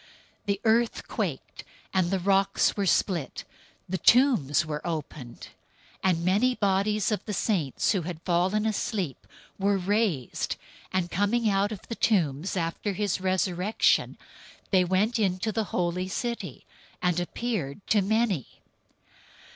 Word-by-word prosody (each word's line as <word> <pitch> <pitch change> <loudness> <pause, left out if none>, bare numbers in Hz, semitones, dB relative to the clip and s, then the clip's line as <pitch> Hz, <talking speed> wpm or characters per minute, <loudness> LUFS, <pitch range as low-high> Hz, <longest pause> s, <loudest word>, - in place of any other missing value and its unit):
The 200 -1 0
earth 230 +1 +2
quaked - - -4 0.3
and 185 -2 +2
the 195 - +1
rocks 195 +1 +2
were 200 -2 0
split. 175 -5 0 0.4
027:052 - - -31
The 190 - -1
tombs 225 - +4
were 150 -1 -4
opened, 150 -6 -6 0.5
and 170 -3 +1
many 220 +8 +3
bodies 200 +1 +1
of 210 - -1
the 210 - -3
saints 170 - 0
who 195 - +1
had 170 -1 -6
fallen 185 +5 +1
asleep 200 - -2 0.3
were 200 +1 +2
raised; 190 - 0 0.4
027:053 185 - +2
and 175 -1 -4
coming 210 +4 +1
out 200 +2 +1
of 210 - -8
the - - -4
tombs 180 -6 +1
after 170 +4 -2
his 195 -1 -1
resurrection, 185 +2 +1 0.5
they 185 -2 +5
entered 205 +6 +1
into 190 +1 0
the 220 +1 -1
holy 180 0 -1
city 235 +5 -4 0.3
and 180 -1 +1
appeared 185 - -3
to 210 - +3
many. 205 - +1
190 Hz, 140 wpm, -27 LUFS, 175-215 Hz, 0.5 s, they